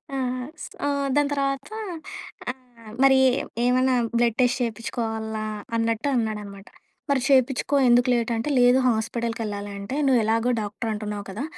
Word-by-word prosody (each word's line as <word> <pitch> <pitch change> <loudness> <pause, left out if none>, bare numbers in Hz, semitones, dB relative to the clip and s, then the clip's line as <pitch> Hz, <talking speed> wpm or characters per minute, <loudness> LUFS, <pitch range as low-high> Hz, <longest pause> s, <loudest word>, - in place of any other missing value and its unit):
ఆహ్, 255 -1 -2 0.2
సొ 285 - -4 0.3
దాని 290 -1 +3
తర్వాత, 275 +2 -1 0.8
ఆహ్, 245 -4 -10
మరి 265 -1 +6 0.5
ఏమన్నా 255 +1 +3 0.2
"బ్లడ్ 235 -2 +2
టెస్ట్ 245 +1 +2
చేపించుకోవాలా?" 220 -1 -3 0.3
అన్నట్టు 230 +3 0
అన్నాడన్నమాట. 210 -3 -3 0.4
"మరి 275 -2 +2
చేపించుకో. 265 +1 +3
ఎందుకు 245 +1 +4
లేట్?" 235 -1 0
అంటే 225 +6 -2
లేదు 245 +1 +6
"హాస్పిటల్‌కి 230 +1 -2
ఎళ్ళాలి 205 0 -5
అంటే 200 +7 -5
నువ్వు 260 -3 +4
ఎలాగో 230 +3 +2
డాక్టర్ 210 +2 -4
అంటున్నావు 210 -1 -5
కదా! 215 +8 -5
235 Hz, 135 wpm, -24 LUFS, 220-255 Hz, 0.8 s, మరి